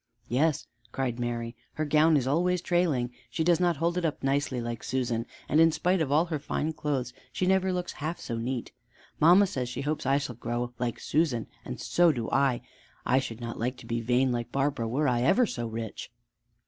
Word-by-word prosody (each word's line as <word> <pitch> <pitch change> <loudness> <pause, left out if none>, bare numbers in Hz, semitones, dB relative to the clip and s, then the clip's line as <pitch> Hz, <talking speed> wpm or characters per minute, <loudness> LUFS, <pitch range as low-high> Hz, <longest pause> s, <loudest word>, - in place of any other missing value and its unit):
"Yes," 145 +4 +1 0.3
cried 125 -2 -2
Mary, 120 0 -3 0.2
"her 155 - -2
gown 155 +1 +4
is 130 - 0
always 175 +6 +2
trailing. 165 -9 +1 0.2
She 160 - -1
does 170 0 +4
not 175 -3 +2
hold 170 +3 +1
it - - -5
up 155 -4 -2
nicely 135 -1 0
like 120 -1 -4
Susan, 120 -2 -1 0.2
and 155 +3 +4
in 165 0 +6
spite 180 +3 +1
of 145 -3 0
all 155 +4 +4
her 160 -4 -3
fine 155 +2 -2
clothes 135 -5 -2 0.2
she 185 - -1
never 190 0 +3
looks 180 -1 -2
half 155 +4 -4
so 115 - -4
neat. 120 +1 -3 0.5
Mamma 180 +6 +7
says 130 -9 -3
she 125 - -4
hopes 150 +2 -2
I 135 +1 +4
shall 140 -3 -3
grow 120 +1 -3
like 120 -2 -2
Susan, 145 -7 +1 0.2
and - - -6
so 175 -1 +4
do 120 -6 -4
I. 135 -3 +2 0.4
I 130 - +4
should 120 -3 -6
not 115 0 -5
like 125 +3 -1
to - - -12
be 115 0 -2
vain 125 +3 +2
like 120 -1 -3
Barbara 135 -4 0
were 140 +6 +1
I 120 -2 +2
ever 235 - +4
so 120 - -4
rich." 115 -1 -6
135 Hz, 210 wpm, -28 LUFS, 120-160 Hz, 0.5 s, Mamma